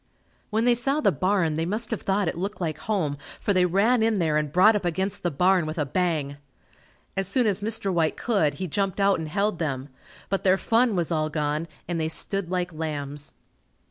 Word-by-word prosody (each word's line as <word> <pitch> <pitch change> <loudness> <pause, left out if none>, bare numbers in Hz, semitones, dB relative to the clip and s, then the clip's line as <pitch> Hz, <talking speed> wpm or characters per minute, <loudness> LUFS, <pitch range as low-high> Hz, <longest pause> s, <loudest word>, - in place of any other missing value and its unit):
When 220 +1 +1
they 245 - +5
saw 270 +5 0
the - - +3
barn, 185 -5 +1
they 165 - 0
must 215 +4 -2
have 225 - -2
thought 195 -1 0
it - - -1
looked 195 +5 -4
like 160 -4 -3
home 160 -10 -1 0.2
for 200 - 0
they 180 -1 +3
ran 215 +7 +3
in 220 -1 +2
there 160 -4 +1
and 150 -1 0
brought 200 +7 +6
up 205 - -1
against 190 +4 -2
the 175 - 0
barn 180 +2 +2
with 155 - -5
a 150 - 0
bang. 150 -2 -1 0.8
As 195 -1 0
soon 240 +5 +2
as 205 -2 +1
Mr. 210 -2 0
White 165 -2 +1
could, 180 - +1
he 185 - -4
jumped 195 +3 -1
out 195 -2 +3
and 160 -1 -5
held 200 +2 0
them, 140 -4 -3 0.4
but 195 0 -1
their 190 -1 +4
fun 230 +1 +2
was 175 -2 -1
all 155 -1 0
gone 150 +1 -2 0.2
and 170 -1 -2
they 160 - 0
stood 190 +2 -2
like 180 -1 -2
lambs. 145 -2 -5
180 Hz, 215 wpm, -25 LUFS, 155-205 Hz, 0.8 s, brought